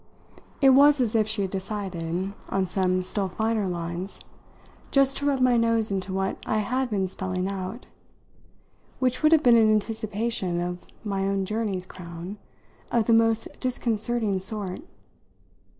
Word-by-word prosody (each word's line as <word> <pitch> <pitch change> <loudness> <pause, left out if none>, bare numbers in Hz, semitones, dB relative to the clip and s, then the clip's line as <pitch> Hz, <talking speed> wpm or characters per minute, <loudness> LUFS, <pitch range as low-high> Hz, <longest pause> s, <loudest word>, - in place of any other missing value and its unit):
It 270 -1 +7
was 285 +2 +6
as 235 -4 +1
if 220 -2 +2
she 215 -2 0
had 190 - -3
decided, 190 -2 -3 0.2
on 195 -1 +1
some 185 0 0
still 195 +1 -2
finer 220 0 0
lines, 175 +2 -4 0.7
just 275 -1 +3
to 285 - -1
rub 275 -2 +1
my 250 -1 +4
nose 230 -2 +2
into 190 -1 -2
what 190 0 -1
I 215 - 0
had 250 +5 0
been 195 -3 0
spelling 185 0 -3
out; 195 +4 -5 1.1
which 255 -1 0
would 310 0 +5
have 320 -2 +5
been 240 -2 +7
an 220 -1 +5
anticipation 215 -3 -1
of 175 0 -4 0.2
my 195 -2 -1
own 195 -1 0
journey's 205 -3 -2
crown 180 +2 -8 0.5
of 235 -2 +2
the 230 - +3
most 225 0 +3
disconcerting 230 -4 0
sort. 195 -1 -4
210 Hz, 150 wpm, -26 LUFS, 185-230 Hz, 1.1 s, It